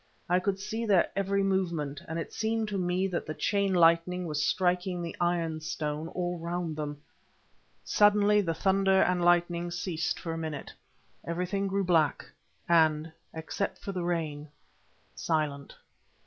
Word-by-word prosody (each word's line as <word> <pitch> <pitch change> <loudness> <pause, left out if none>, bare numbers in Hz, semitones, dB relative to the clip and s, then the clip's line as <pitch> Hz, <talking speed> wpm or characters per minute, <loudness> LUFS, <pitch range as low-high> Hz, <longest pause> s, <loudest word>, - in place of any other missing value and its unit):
I 180 +1 +3
could 190 +1 -1
see 220 +3 -3
their 195 -4 +3
every 195 0 +1
movement, 170 -7 -1
and 160 - -4
it 165 - -5
seemed 220 0 -1
to 200 - -2
me 180 +1 0
that 175 - -3
the 155 - -4
chain 200 +5 +1
lightning 175 +1 +3
was 150 -3 -1
striking 180 +2 +1
the 170 -1 -5
iron 170 -2 0
stone 155 0 -3
all 175 0 -3
round 170 -1 -3
them. 145 -1 -5 0.8
Suddenly 210 0 +4
the 165 -4 -2
thunder 190 +1 +3
and 180 -1 +1
lightning 175 0 +2
ceased 175 -1 -2
for 165 -2 -4
a 165 - -4
minute, 155 -3 -5 0.5
everything 180 +4 -2
grew 195 +1 0
black, 165 -6 +2 0.4
and, 160 -2 +3 0.2
except 160 +5 -3
for 200 - -6
the 180 -2 -3
rain, 155 -4 -2 0.6
silent. 150 -4 -2
175 Hz, 150 wpm, -29 LUFS, 160-190 Hz, 0.8 s, Suddenly